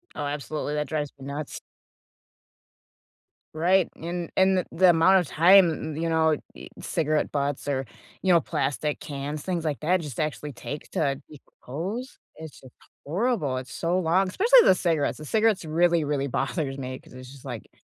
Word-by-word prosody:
Oh, 145 Hz, -, -3 dB
absolutely. 145 Hz, +1 st, -3 dB
That 150 Hz, -1 st, -1 dB
drives 150 Hz, -2 st, -2 dB
me 135 Hz, -, -9 dB
nuts. 145 Hz, +1 st, -5 dB, 1.9 s
Right. 180 Hz, +3 st, +3 dB
And 170 Hz, +1 st, -4 dB
and 190 Hz, 0 st, +4 dB
the -, -, -3 dB
the 185 Hz, +1 st, +5 dB
amount 185 Hz, +4 st, +5 dB
of 175 Hz, -, -2 dB
time, 170 Hz, -3 st, +4 dB
you 165 Hz, +1 st, -1 dB
know, 160 Hz, -2 st, +3 dB, 0.2 s
y -, -, -10 dB
cigarette 155 Hz, -1 st, -1 dB
butts 140 Hz, 0 st, -2 dB
or, 135 Hz, -2 st, -1 dB, 0.4 s
you 190 Hz, -, +2 dB
know, 170 Hz, -, +6 dB
plastic 150 Hz, -1 st, -2 dB
cans, 145 Hz, 0 st, -5 dB
things 175 Hz, -3 st, -2 dB
like 150 Hz, -2 st, -2 dB
that 180 Hz, +4 st, +2 dB
just 150 Hz, -7 st, -7 dB
actually 150 Hz, -1 st, -3 dB
take 145 Hz, +4 st, -7 dB
to 140 Hz, -2 st, -1 dB
decompose, 170 Hz, -, -7 dB, 0.2 s
It's 160 Hz, -2 st, -10 dB
just 130 Hz, -2 st, -15 dB, 0.3 s
horrible. 170 Hz, -, 0 dB
It's 130 Hz, +2 st, -7 dB
so 175 Hz, +2 st, 0 dB
long. 185 Hz, +3 st, +2 dB
Especially 485 Hz, -, +5 dB
the 185 Hz, -, +6 dB
cigarettes. 165 Hz, -5 st, 0 dB
The 155 Hz, -, -9 dB
cigarettes 215 Hz, -2 st, +2 dB
really, 170 Hz, +1 st, +2 dB
really 140 Hz, -1 st, -1 dB
bothers 135 Hz, +1 st, -2 dB
me 130 Hz, -1 st, -5 dB
‘cause -, -, -18 dB
it's 130 Hz, 0 st, -11 dB
just 140 Hz, -2 st, -14 dB
like -, -, -7 dB
155 Hz, 170 wpm, -26 LUFS, 145-175 Hz, 1.9 s, know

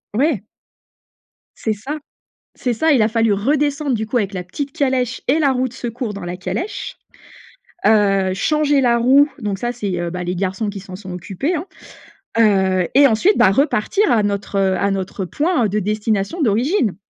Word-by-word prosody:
Ouais. 265 Hz, -, +1 dB, 1.1 s
C'est 220 Hz, -, -1 dB
ça, 265 Hz, +9 st, -5 dB, 0.6 s
c'est 245 Hz, -, -2 dB
ça, 320 Hz, +7 st, +2 dB
il 255 Hz, -6 st, +4 dB
a 215 Hz, -, +3 dB
fallu 225 Hz, -1 st, +2 dB
redescendre, 285 Hz, +6 st, 0 dB
du 220 Hz, -1 st, -2 dB
coup, 235 Hz, -, -3 dB
avec 205 Hz, -4 st, 0 dB
la 180 Hz, -, -3 dB
petite 275 Hz, +11 st, -6 dB
calèche 260 Hz, -5 st, 0 dB
et 285 Hz, +5 st, +3 dB
la 285 Hz, -4 st, +3 dB
roue 255 Hz, 0 st, 0 dB
de 240 Hz, -, -16 dB
secours 240 Hz, -3 st, -5 dB
dans 200 Hz, -3 st, -7 dB
la 175 Hz, +1 st, -4 dB
calèche, 345 Hz, -, -4 dB, 0.9 s
heu, 195 Hz, -3 st, +3 dB
changer 295 Hz, +6 st, +2 dB
la 240 Hz, -2 st, +3 dB
roue, 270 Hz, +5 st, +5 dB
donc, 205 Hz, -5 st, -3 dB
ça, 240 Hz, 0 st, -1 dB
c'est, 195 Hz, -7 st, -3 dB
heu, 175 Hz, 0 st, -2 dB
bah, 180 Hz, +1 st, -5 dB
les 180 Hz, +1 st, -3 dB
garçons 195 Hz, +3 st, -2 dB
qui 200 Hz, 0 st, -6 dB
s'en 185 Hz, -1 st, -10 dB
sont 185 Hz, -1 st, -9 dB
occupés, 195 Hz, -, -3 dB
hein, 320 Hz, +2 st, -3 dB, 0.7 s
heu 190 Hz, -5 st, +3 dB
et 280 Hz, +2 st, +7 dB
ensuite, 275 Hz, -, +3 dB
bah, 190 Hz, -, +5 dB
repartir 285 Hz, -, +1 dB
à 220 Hz, -3 st, +3 dB
notre, 200 Hz, 0 st, -2 dB
heu, 190 Hz, -1 st, +2 dB
à 200 Hz, -, +1 dB
notre 195 Hz, 0 st, -3 dB
point 295 Hz, -, 0 dB
de 205 Hz, +2 st, -1 dB
destination 215 Hz, -, -1 dB
d'origine! 235 Hz, -, +1 dB
220 Hz, 185 wpm, -19 LUFS, 195-275 Hz, 1.1 s, et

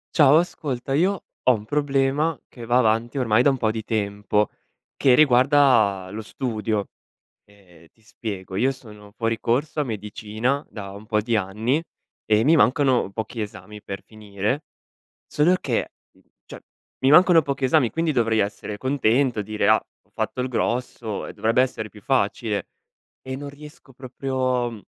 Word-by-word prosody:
Ciao, 150 Hz, 0 st, +6 dB
ascolta, 135 Hz, -7 st, -3 dB
io 185 Hz, +6 st, +1 dB, 0.2 s
ho 130 Hz, -, +4 dB
un 105 Hz, -2 st, -4 dB
problema 145 Hz, +3 st, 0 dB
che 120 Hz, -2 st, -10 dB
va 120 Hz, +2 st, +3 dB
avanti 115 Hz, +3 st, +1 dB
ormai 120 Hz, -1 st, +3 dB
da -, -, +5 dB
un 135 Hz, -, +1 dB
po' 115 Hz, -4 st, 0 dB
di 110 Hz, 0 st, -4 dB
tempo, 105 Hz, -1 st, 0 dB, 0.5 s
che 130 Hz, -, +4 dB
riguarda 125 Hz, -8 st, +4 dB
lo 110 Hz, -, -5 dB
studio. 110 Hz, -3 st, -3 dB, 0.6 s
Ehm, 90 Hz, -5 st, -21 dB
ti 110 Hz, -, -32 dB
spiego, 100 Hz, -4 st, -7 dB
io 130 Hz, +7 st, +2 dB
sono 105 Hz, -5 st, -13 dB
fuori 115 Hz, -1 st, -1 dB
corso 140 Hz, +6 st, -1 dB
a -, -, +2 dB
medicina 110 Hz, +3 st, -3 dB
da 100 Hz, -3 st, -8 dB
un 100 Hz, +2 st, -11 dB
po' 105 Hz, -1 st, +1 dB
di 115 Hz, +2 st, -1 dB
anni 110 Hz, +8 st, 0 dB, 0.4 s
e 105 Hz, +1 st, +3 dB
mi 155 Hz, +6 st, +5 dB
mancano 135 Hz, -6 st, +3 dB
pochi 110 Hz, +2 st, -5 dB
esami 105 Hz, 0 st, -8 dB
per 100 Hz, -1 st, -7 dB
finire. 110 Hz, +6 st, -4 dB, 0.6 s
Solo 165 Hz, +5 st, +2 dB
che, -, -, -1 dB, 0.6 s
cioè, -, -, -10 dB, 0.4 s
mi 130 Hz, -, +3 dB
mancano 175 Hz, +2 st, +7 dB
pochi 140 Hz, -2 st, -4 dB
esami, 130 Hz, -1 st, +3 dB
quindi 165 Hz, +3 st, -1 dB
dovrei 115 Hz, -4 st, +1 dB
essere 105 Hz, 0 st, -2 dB
contento, 130 Hz, -1 st, +1 dB
dire: 105 Hz, +1 st, -1 dB
"Ah! -, -, +4 dB, 0.2 s
Ho -, -, -37 dB
fatto -, -, -3 dB
il 125 Hz, +1 st, -1 dB
grosso 120 Hz, -3 st, -2 dB
e -, -, -8 dB
dovrebbe 115 Hz, +4 st, +2 dB
essere 110 Hz, -4 st, -4 dB
più 105 Hz, -1 st, -16 dB
facile." 110 Hz, -4 st, 0 dB, 0.6 s
E 130 Hz, 0 st, -5 dB
non 140 Hz, +1 st, -7 dB
riesco 150 Hz, 0 st, -14 dB
proprio, 130 Hz, -1 st, -2 dB
mhmm, 110 Hz, -3 st, -10 dB
120 Hz, 160 wpm, -23 LUFS, 105-135 Hz, 0.6 s, mancano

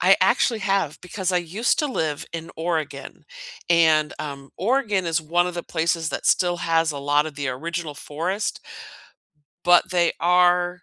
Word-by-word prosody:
I -, -, +6 dB
actually 230 Hz, -3 st, +2 dB
have 195 Hz, -6 st, 0 dB
because 185 Hz, 0 st, -3 dB
I 180 Hz, -, +3 dB
used 185 Hz, +8 st, -1 dB
to 300 Hz, -, +1 dB
live 160 Hz, -, -2 dB
in 165 Hz, 0 st, -6 dB
Oregon. 160 Hz, -4 st, -4 dB, 0.5 s
And, 160 Hz, -2 st, +4 dB
um, 140 Hz, -2 st, -7 dB
Oregon 210 Hz, -3 st, 0 dB
is 165 Hz, -1 st, 0 dB
one 175 Hz, +3 st, +1 dB
of 180 Hz, -, -5 dB
the 175 Hz, -, -4 dB
places 165 Hz, -1 st, -1 dB
that -, -, -4 dB
still 175 Hz, -1 st, +2 dB
has 165 Hz, -2 st, +1 dB
a 145 Hz, -, -6 dB
lot 145 Hz, +2 st, +1 dB
of 150 Hz, -, -8 dB
the 140 Hz, -2 st, -3 dB
original 155 Hz, +3 st, -4 dB
forest 175 Hz, +9 st, -3 dB, 1.1 s
but 175 Hz, +1 st, +5 dB
they 175 Hz, -2 st, +2 dB
are 180 Hz, +1 st, +3 dB
170 Hz, 165 wpm, -23 LUFS, 155-180 Hz, 1.1 s, I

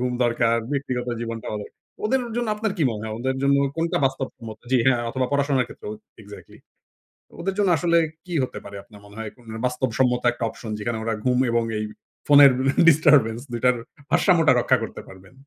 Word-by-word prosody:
ঘুম 125 Hz, 0 st, -1 dB
দরকার। 115 Hz, -1 st, +2 dB, 0.2 s
ব্যক্তিগত 125 Hz, -3 st, -2 dB
জীবনটা। 115 Hz, -1 st, -5 dB, 0.6 s
ওদের 265 Hz, +4 st, +2 dB, 0.2 s
জন্য 240 Hz, -2 st, -1 dB
আপনার 215 Hz, -1 st, -2 dB
কি -, -, +1 dB
মনে 105 Hz, -1 st, -5 dB
হয়? 110 Hz, -1 st, -4 dB
ওদের 130 Hz, +2 st, -2 dB
জন্য 140 Hz, 0 st, +4 dB, 0.2 s
কোনটা 165 Hz, +1 st, 0 dB
বাস্তব 135 Hz, 0 st, -1 dB
সম্মত? 115 Hz, -3 st, -9 dB
জি, 130 Hz, -, +4 dB
হ্যাঁ, 125 Hz, -3 st, +3 dB
অথবা 130 Hz, 0 st, -1 dB
পড়াশোনার 140 Hz, -3 st, +1 dB
ক্ষেত্রেও 105 Hz, -, -8 dB, 0.3 s
এক্সাক্টলি। 105 Hz, 0 st, -13 dB, 0.8 s
ওদের 195 Hz, +2 st, -2 dB
জন্য 205 Hz, -2 st, +2 dB
আসলে 170 Hz, +1 st, +2 dB, 0.3 s
কি 180 Hz, -, -7 dB
হতে -, -, -5 dB
পারে, 100 Hz, -, -10 dB
আপনার 105 Hz, -3 st, -16 dB
মনে 100 Hz, +1 st, -15 dB
হয়? 110 Hz, -2 st, -5 dB, 0.4 s
বাস্তব 125 Hz, 0 st, -1 dB
সম্মত 125 Hz, -1 st, +2 dB
একটা 120 Hz, 0 st, -6 dB
অপশন, 110 Hz, -3 st, -9 dB
যেখানে 115 Hz, +2 st, -3 dB
ওরা 115 Hz, -, -1 dB
ঘুম 125 Hz, 0 st, +2 dB
এবং 115 Hz, 0 st, +2 dB
এই 110 Hz, -, -2 dB, 0.4 s
ফোনের 145 Hz, -2 st, +8 dB, 0.4 s
ডিস্টার্বেন্স 145 Hz, -7 st, +5 dB
২ 120 Hz, -, -3 dB
টার 125 Hz, -, +5 dB, 0.3 s
ভারসাম্যটা 165 Hz, -7 st, +4 dB
রক্ষা -, -, +3 dB
করতে -, -, -7 dB
পারবেন? 95 Hz, +3 st, -15 dB
125 Hz, 180 wpm, -23 LUFS, 115-145 Hz, 0.8 s, ফোনের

